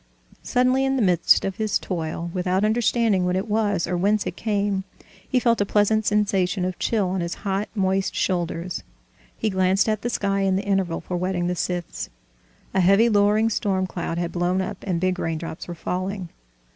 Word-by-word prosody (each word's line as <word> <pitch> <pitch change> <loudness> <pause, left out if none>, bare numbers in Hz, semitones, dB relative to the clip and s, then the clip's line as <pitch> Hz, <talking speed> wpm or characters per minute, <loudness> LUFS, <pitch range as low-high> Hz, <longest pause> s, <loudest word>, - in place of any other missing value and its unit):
Suddenly, 255 +2 +2
in 270 0 +1
the 260 - +1
midst 180 -4 +4
of 195 -1 -3
his 215 -2 +1
toil, 170 -1 -4
without 185 +2 +1
understanding 220 -3 +2
what 180 0 0
it 190 +4 -1
was 205 -4 +1
or 180 - -2
whence 200 +4 +1
it 180 -1 -4
came, 205 -2 -1 0.5
he 255 - +3
felt 235 -3 +2
a - - +5
pleasant 210 +1 +2
sensation 195 -3 +1
of 185 0 -4
chill 210 -5 +1
on 185 0 -1
his 170 0 -3
hot, 195 +1 -1
moist 190 -1 0
shoulders. 175 -1 -1 0.6
He 215 - -1
glanced 190 +2 +2
at 215 -1 0
the 240 - -2
sky 200 -3 0
in 195 -1 +2
the 195 - -2
interval 195 -4 0
for 180 +1 -4
whetting 180 0 -1
the 180 0 0
scythes. 175 -1 -3 0.6
A 195 - +2
heavy, 195 +6 +5
lowering 210 +1 +3
storm 190 -3 0
cloud 175 -2 -4
had 170 0 -2
blown 180 +1 0
up, 195 +1 -3
and 175 -3 0
big 185 0 0
raindrops 165 0 -4
were 175 - -6
falling. 185 +2 -3
190 Hz, 190 wpm, -23 LUFS, 180-210 Hz, 0.6 s, a